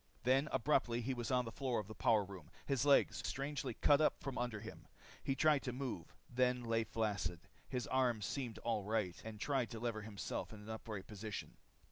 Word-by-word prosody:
Then 135 +4 +4
abruptly 130 -3 +2
he 130 +3 -1
was 120 -2 -3
on 125 -1 +3
the 115 - -5
floor 130 -2 0
of 105 - -5
the 110 - -7
power 110 -1 +4
room, 95 -5 -10 0.2
his 140 -1 +1
legs 140 - +5
strangely 135 -3 -2
cut 145 +5 +5
out 155 - +3
from 135 -2 -4
under 120 -3 -1
him. 110 +2 -9 0.4
He 135 - +1
tried 150 0 +4
to 125 - -2
move 125 -10 -4
them. 125 0 +2
They - - -6
lay 115 0 +3
flaccid. 105 -6 -1 0.3
His 125 -1 -1
arms 125 -5 +2
seemed 120 -6 -3
all 115 -3 0
right 105 -4 -1
and 110 -1 -7
tried 135 -1 +1
to 115 - -6
lever 115 -2 -1
himself 105 -2 -4
to - - -9
an 105 0 -11
upright 110 -3 -5
position. 105 0 -6
120 Hz, 205 wpm, -38 LUFS, 110-130 Hz, 0.4 s, legs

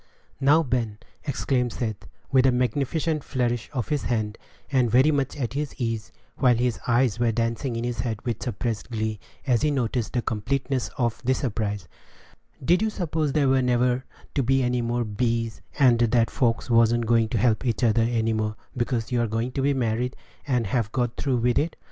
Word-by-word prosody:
"Now, 150 +4 +5
Ben," 120 -6 -1 0.3
exclaimed 130 -4 0
Seth, 110 -5 -4 0.2
with 130 0 +5
a - - +5
magnificent 145 +5 0
flourish 120 -2 -1
of 125 -5 -3
his 150 -3 0
hand, 110 -3 -1 0.3
and 125 -4 +3
very 130 +7 +5
much 140 -1 -1
at 120 -4 -2
his 145 +1 -3
ease, 115 -3 -2 0.3
while 125 -3 +4
his 120 0 0
eyes 120 -1 +2
were 120 -1 +3
dancing 115 +2 -1
in 115 - -2
his 120 -1 -3
head 115 -3 -2
with 120 -3 -2
suppressed 115 -4 -3
glee, 110 -2 -2 0.3
as 125 -4 +2
he 150 - +2
noticed 125 -4 -1
the 120 - 0
completeness 130 +4 -1
of 120 -4 0
the 130 +1 +2
surprise, 105 -7 -2 0.8
"did 175 +5 +4
you 220 - +2
suppose 160 -7 -1
there 145 -3 +3
were 135 0 +4
never 125 0 +2 0.3
to 140 - +1
be 135 +1 +2
any 125 0 +1
more 120 +1 0
'bees,' 115 +1 -1 0.2
and 125 -5 +5
that 115 0 +3
folks 115 -3 +1
wan't 115 0 +4
going 115 -1 +3
to 120 - -1
help 110 +2 +2
each 120 -1 -1
other 115 -1 +4
any 115 -1 +1
more, 110 0 -1 0.2
because 120 -1 -1
you 120 -1 +2
are 115 - +1
going 115 +3 -2
to 135 - -2
be 140 +1 +2
married, 125 0 -1 0.3
and 125 -4 +1
have 110 +1 -1
got 120 -2 -1
through 135 -3 0
with 120 0 +2
it? 155 +2 -1
120 Hz, 195 wpm, -25 LUFS, 115-130 Hz, 0.8 s, Now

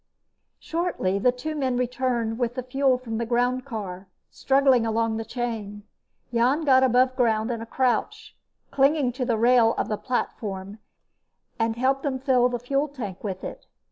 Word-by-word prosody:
Shortly 325 - -1
the 250 +5 +3
two 250 +6 -5
men 260 -4 0
returned 245 -2 -1
with 245 -1 -1
the 255 - -3
fuel 265 +1 +2
from 230 -3 -5
the 235 - -1
groundcar, 235 -6 -2 0.2
struggling 270 -3 +3
along 225 0 0
the 225 - -3
chain. 220 -4 -5 0.5
Jan 250 +7 +2
got 260 -2 +5
above 255 0 +3
ground 225 -2 +1
in 230 -1 -4
a 230 - -7
crouch, 255 0 -1 0.4
clinging 275 -1 +3
to 250 +1 -3
the 235 -2 0
rail 235 0 +4
of - - -1
the 210 - -1
platform, 205 -5 -4 0.8
and 225 0 +1
helped 265 +3 +1
them 275 -3 -2
fill 255 -2 +3
the 245 - -2
fuel 275 +5 -1
tank 225 -10 -7
with 190 -3 -4
it. - - -8
245 Hz, 165 wpm, -25 LUFS, 225-260 Hz, 0.8 s, got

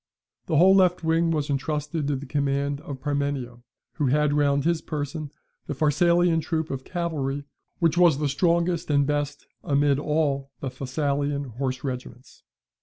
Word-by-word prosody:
The 160 - +1
whole 185 +4 +7
left 180 -2 +3
wing 165 +1 +2
was 150 -3 0
entrusted 150 +2 -2
to 145 - 0
the 135 +2 -6
command 140 0 -1
of 140 -2 -7
Parmenio, 140 -4 -2 0.4
who 150 -4 +1
had 150 +2 +2
round 140 -1 +2
his 170 -1 +1
person 150 0 -4 0.4
the 145 - -3
Pharsalian 165 +3 +3
troop 160 0 -2
of 135 -1 -4
cavalry, 145 -6 -3 0.3
which 170 0 +2
was 170 -6 +5
the 150 0 0
strongest 170 +4 +1
and 140 -1 +3
best 145 0 -2 0.2
amid 140 -1 +2
all 145 -3 0
the 135 - -3
Thessalian 140 +2 -1 0.2
horse 130 -1 -2
regiments. 125 -1 -7
145 Hz, 155 wpm, -25 LUFS, 140-160 Hz, 0.4 s, whole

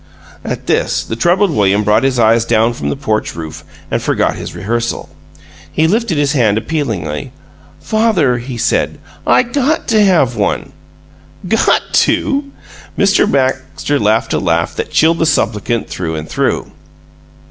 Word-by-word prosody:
At - - -5
this, - - 0
the 115 - -5
troubled 175 - +2
William 105 -5 +2
brought 105 +2 +3
his 135 -1 +1
eyes 115 0 +4
down 115 0 +2
from 70 -10 -4
the 70 - -1
porch - - -2
roof 80 -2 -7 0.3
and - - 0
forgot - - 0
his - - -7
rehearsal. 115 +3 -3 0.6
He 160 - +1
lifted 210 -1 +1
his 145 -1 +1
hand 115 -7 +2
appealingly. 110 - -3 0.5
"Father," 200 - +1
he 120 0 -6
said, - - 0 0.3
"I - - +5
GOT 280 +5 -1
to 215 -2 +4
have 160 - +3
one!" 105 -2 -1 0.8
"'Got 225 +4 +2
to'!" 280 +1 +2 0.5
Mr. 200 0 +3
Baxter 130 +1 0
laughed 110 +2 +1
a - - +1
laugh 85 -2 0
that - - -3
chilled 165 +1 +3
the 165 - +2
supplicant 115 -5 0
through 80 -3 -4
and 80 0 -5
through. - - -1
125 Hz, 150 wpm, -15 LUFS, 105-170 Hz, 0.8 s, I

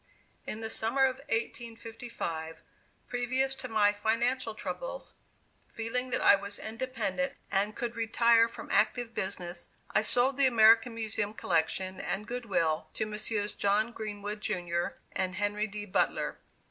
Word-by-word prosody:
In 215 - -4
the 220 - -3
summer 235 +6 +2
of 260 -1 +3
1855, 225 -8 -4 0.5
previous 255 +2 0
to 265 -1 -7
my 210 -3 +3
financial 230 +3 0
troubles, - - -5 0.6
feeling 250 +3 -2
that 250 - 0
I - - +9
was 200 +1 -6
independent 255 +2 -2 0.2
and 205 +2 +1
could 240 -1 -3
retire 230 0 +4
from - - -8
active 230 +2 +2
business, 175 -2 -4 0.2
I - - +4
sold 250 +4 +2
the 280 -1 +6
American 230 0 +6
Museum 215 -1 -2
collection 185 +2 0
and 205 +2 -2
good 245 -1 -4
will 160 -5 +1
to 220 - 0
Messrs. 210 0 -2
John 210 +3 +2
Greenwood, 210 -2 -5
Junior, 175 -4 -2
and 185 -1 -1
Henry 205 +2 0
D. 210 0 -6
Butler. 185 - 0
220 Hz, 140 wpm, -30 LUFS, 205-240 Hz, 0.6 s, I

